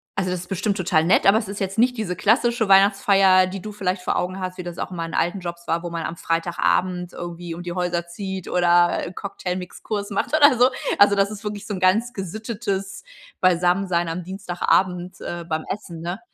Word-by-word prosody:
also, 185 -1 -1
das 180 - -3
ist 180 - -12
bestimmt 195 +2 -1
total 165 -4 +1
nett, 180 - +3
aber 200 +2 +6
es 220 - -2
ist 200 +1 -6
jetzt 195 +2 -3
nicht 250 +2 +3
diese 200 -5 -2
klassische 225 +1 +2
Weihnachtsfeier, 195 -1 +5
die 190 0 -6
du 215 - -7
vielleicht 185 -2 -2
vor - - -1
Augen 185 +1 -2
hast, 185 0 -4
wie 180 - -5
das 175 -1 -7
auch - - -4
in 180 - -7
meinen 165 0 -4
alten 175 +3 0
Jobs 170 -1 -7
war, 170 +1 0
wo 175 - -5
man 170 0 -4
Freitagabend 175 +2 0
irgendwie 175 -1 -6
um 175 - -8
die 175 - -5
Häuser 175 -1 -1
zieht 190 +1 -6
oder 175 -1 +3
Cocktailmix-Kurs 195 +2 -5
macht 205 +9 -1
oder 285 -5 +6
so. 250 +2 +5 0.3
Also, 200 0 +6
das 200 +1 +2
ist 210 0 -9
wirklich 210 0 -5
so 205 - -4
'n 185 - -4
ganz 215 +6 +2
gesittetes 200 - -4 0.3
Beisammensein 180 -1 +2
am 170 +2 -4
Dienstagabend, 180 -1 -1
äh, 175 -1 -5
beim 160 -1 -2
Essen, 170 -5 -6
ne? 175 +4 -4
185 Hz, 205 wpm, -22 LUFS, 175-200 Hz, 0.3 s, aber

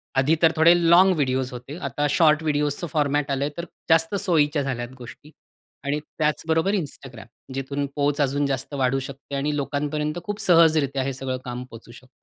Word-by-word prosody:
आधी 135 +5 +3
तर 165 -1 +5
थोडे 165 +2 +6 0.2
लाँग 185 +3 +6
व्हिडिओज 130 -3 -1
होते. 125 +5 -8
आता 145 -4 -2
शॉर्ट 155 0 +3
व्हिडिओजच 150 -2 0
फॉर्मॅट 145 -1 0
आलंय, 140 +2 -1
तर 170 - -4 0.2
जास्त 165 +4 +3
सोयीच्या 150 -6 +2
झाल्यात 120 -3 -4
गोष्टी 130 +5 -12 0.5
आणि 145 +2 -1 0.2
त्याचबरोबर 160 +4 0
Instagram. 135 - -6 0.3
जिथून 140 +1 -3
पोहच 145 0 0
अजून 140 +1 +1
जास्त 135 +1 -3
वाढू 135 0 +1
शकते 140 +1 -8
आणि 145 +2 -1
लोकांपर्यंत 150 +3 -2
खूप 205 0 -4
सहजरित्या 155 -6 +3
हे 135 +1 -2
सगळं 130 0 -4
काम 125 0 -5
पोहचू 115 +1 -12
शकतं. 130 +2 -15
145 Hz, 165 wpm, -23 LUFS, 135-155 Hz, 0.5 s, थोडे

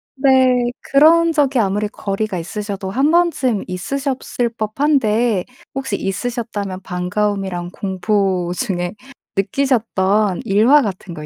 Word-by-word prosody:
네. 260 -3 +3
그런 330 +4 +4
적이 280 -4 +2
아무리 205 0 0
거리가 200 -1 -3
있으셔도 200 +2 -5
1 270 +9 +2
번쯤 320 - +1
있으셨을 250 +5 -2
법한데 225 -3 +1 0.3
혹시 265 -7 -2
있으셨다면 205 -2 -4
반가움이랑 180 0 -2
공포 190 -2 -1
중에 180 -6 -2 0.4
느끼셨던 210 -3 +1
일화 230 +9 +5
같은 190 -5 -5
거 150 -2 -8
210 Hz, 260 characters per minute, -19 LUFS, 190-260 Hz, 0.4 s, 일화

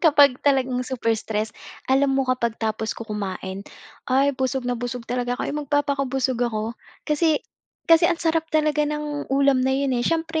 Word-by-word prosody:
kapag 285 -4 +6
talagang 265 -3 +2
super 245 -3 -1
stress. 215 0 -2 0.4
Alam 270 0 +3
mo 270 - +2
kapag 245 -3 0
tapos 220 0 -2
ko 230 - -6
kumain 195 -3 -5 0.5
ay 270 +2 +3
busog 260 0 -1
na 245 - 0
busog 245 0 -5
talaga 245 +1 -2
ako, 295 +4 -3
magpapakabusog 275 -3 0
ako 220 0 -3 0.3
kasi 305 0 +2 0.5
kasi 330 0 +5
ang 345 - +1
sarap 325 -1 0
talaga 305 -1 +1
ng 300 -1 -4
ulam 275 -1 +3
na 260 - +1
yun, 275 -1 0
eh. 245 - +1
Siyempre 325 +4 0
265 Hz, 165 wpm, -23 LUFS, 240-295 Hz, 0.5 s, kapag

